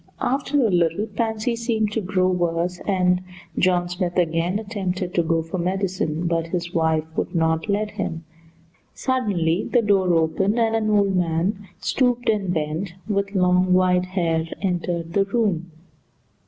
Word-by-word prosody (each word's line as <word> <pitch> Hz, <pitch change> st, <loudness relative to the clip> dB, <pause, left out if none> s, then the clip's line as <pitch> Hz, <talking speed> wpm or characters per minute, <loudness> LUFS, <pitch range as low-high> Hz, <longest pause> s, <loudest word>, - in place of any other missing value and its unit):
After 275 Hz, +1 st, +1 dB
a 215 Hz, -, +2 dB
little 175 Hz, +3 st, +2 dB
Pansy 225 Hz, +1 st, -1 dB
seemed 225 Hz, -2 st, 0 dB
to 220 Hz, -, -1 dB
grow 185 Hz, -1 st, +1 dB
worse, 175 Hz, 0 st, -1 dB
and 180 Hz, -2 st, +2 dB, 0.4 s
John 180 Hz, -1 st, +2 dB
Smith 175 Hz, 0 st, -3 dB
again 170 Hz, +2 st, +1 dB
attempted 190 Hz, -4 st, -3 dB
to 170 Hz, -, +3 dB
go 165 Hz, 0 st, 0 dB
for 165 Hz, +3 st, -5 dB
medicine, 180 Hz, -3 st, -1 dB
but 165 Hz, -1 st, 0 dB
his 175 Hz, 0 st, -3 dB
wife 160 Hz, -1 st, +2 dB
would -, -, -2 dB
not 160 Hz, +3 st, +1 dB
let 210 Hz, +1 st, 0 dB
him. 175 Hz, -6 st, -4 dB, 0.7 s
Suddenly 200 Hz, -10 st, 0 dB
the 240 Hz, -2 st, +3 dB
door 195 Hz, -3 st, +3 dB
opened, 190 Hz, +7 st, +1 dB
and 225 Hz, -1 st, +2 dB
an 215 Hz, -1 st, 0 dB
old 200 Hz, -2 st, +3 dB
man, 180 Hz, +4 st, 0 dB
stooped 245 Hz, -1 st, +1 dB
and 200 Hz, -4 st, +1 dB
bent, 165 Hz, +3 st, -2 dB
with 200 Hz, -1 st, -1 dB
long 180 Hz, 0 st, +3 dB
white 180 Hz, 0 st, +3 dB
hair, 165 Hz, -3 st, -1 dB
entered 175 Hz, -3 st, -2 dB
the 195 Hz, +1 st, +3 dB
room. 195 Hz, -5 st, 0 dB
185 Hz, 155 wpm, -23 LUFS, 170-205 Hz, 0.7 s, to